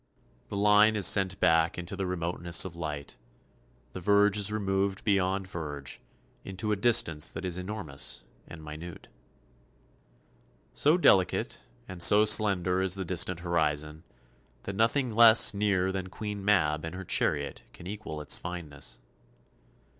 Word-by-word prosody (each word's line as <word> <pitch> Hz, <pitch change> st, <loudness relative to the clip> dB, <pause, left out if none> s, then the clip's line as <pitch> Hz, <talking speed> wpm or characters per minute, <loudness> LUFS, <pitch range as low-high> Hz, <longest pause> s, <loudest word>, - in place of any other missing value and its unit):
The 100 Hz, -, -6 dB
line 105 Hz, +2 st, +4 dB
is 100 Hz, -3 st, +1 dB
sent 95 Hz, -1 st, +2 dB
back 80 Hz, -1 st, +2 dB
into 90 Hz, +3 st, -6 dB
the 95 Hz, -1 st, -3 dB
remoteness 85 Hz, -1 st, -1 dB
of 90 Hz, -2 st, -8 dB
light, 75 Hz, -4 st, -7 dB, 0.8 s
the -, -, -6 dB
verge 100 Hz, +2 st, +3 dB
is 105 Hz, 0 st, +1 dB
removed 95 Hz, -2 st, -2 dB
beyond 95 Hz, -2 st, 0 dB
verge, 75 Hz, -6 st, -7 dB, 0.4 s
into 95 Hz, +3 st, -5 dB
a -, -, +2 dB
distance 95 Hz, -8 st, +2 dB
that -, -, -7 dB
is 90 Hz, -2 st, -2 dB
enormous 85 Hz, -, -4 dB, 0.2 s
and 80 Hz, -2 st, -11 dB
minute. 80 Hz, +3 st, -10 dB, 1.6 s
So 150 Hz, +4 st, +3 dB
delicate 95 Hz, -, +2 dB, 0.3 s
and 90 Hz, -2 st, -8 dB
so 105 Hz, +5 st, +6 dB
slender 95 Hz, -4 st, +3 dB
is 95 Hz, -1 st, 0 dB
the 95 Hz, -1 st, -5 dB
distant 90 Hz, 0 st, +1 dB
horizon 75 Hz, -2 st, -2 dB, 0.6 s
that 100 Hz, -, -6 dB
nothing 115 Hz, +4 st, 0 dB
less 115 Hz, 0 st, +7 dB
near 100 Hz, -2 st, 0 dB
than 95 Hz, -1 st, -5 dB
Queen 105 Hz, +1 st, -6 dB
Mab 75 Hz, -7 st, +1 dB
and 80 Hz, +2 st, -6 dB
her 95 Hz, 0 st, -8 dB
chariot 70 Hz, -4 st, -1 dB
can -, -, -14 dB
equal 95 Hz, -6 st, -7 dB
its 75 Hz, -, +1 dB
fineness. 75 Hz, -8 st, -8 dB
95 Hz, 140 wpm, -28 LUFS, 80-105 Hz, 1.6 s, less